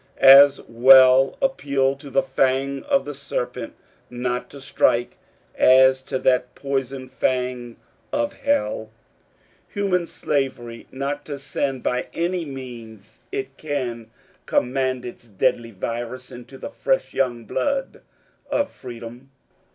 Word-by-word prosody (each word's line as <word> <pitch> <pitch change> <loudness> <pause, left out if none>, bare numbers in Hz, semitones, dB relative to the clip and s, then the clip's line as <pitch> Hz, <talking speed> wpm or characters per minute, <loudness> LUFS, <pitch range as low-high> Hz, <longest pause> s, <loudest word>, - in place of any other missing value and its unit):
As 140 +1 +8
well 130 +2 +6
appeal 140 - +1
to 140 +1 -11
the 135 0 +2
fang 135 +1 0
of 275 -1 +1
the 145 - -5
serpent 125 -3 -5 0.4
not 125 0 -3
to 140 - -11
strike 120 -3 0 0.3
as 130 0 +5
to - - -2
that 125 -1 +1
poisoned 135 -1 -4
fang 125 -2 -2 0.4
of 290 0 -1
Hell, 285 - -1 0.8
Human 185 -4 0
Slavery, 130 -7 -3
not 140 +2 -4
to 145 -2 -5
send 135 -1 -3
by 125 0 -1
any 175 0 -1
means 115 -6 -10
it 405 0 -5
can 125 -7 -4 0.4
command 130 0 0
its 120 -1 -10
deadly 115 +3 0
virus 120 +4 -5
into 125 +2 -11
the 285 - -7
fresh - - -1
young 120 -3 -1
blood 275 - -2 0.5
of 285 - 0
Freedom. 120 +1 -10
130 Hz, 120 wpm, -22 LUFS, 125-140 Hz, 0.8 s, As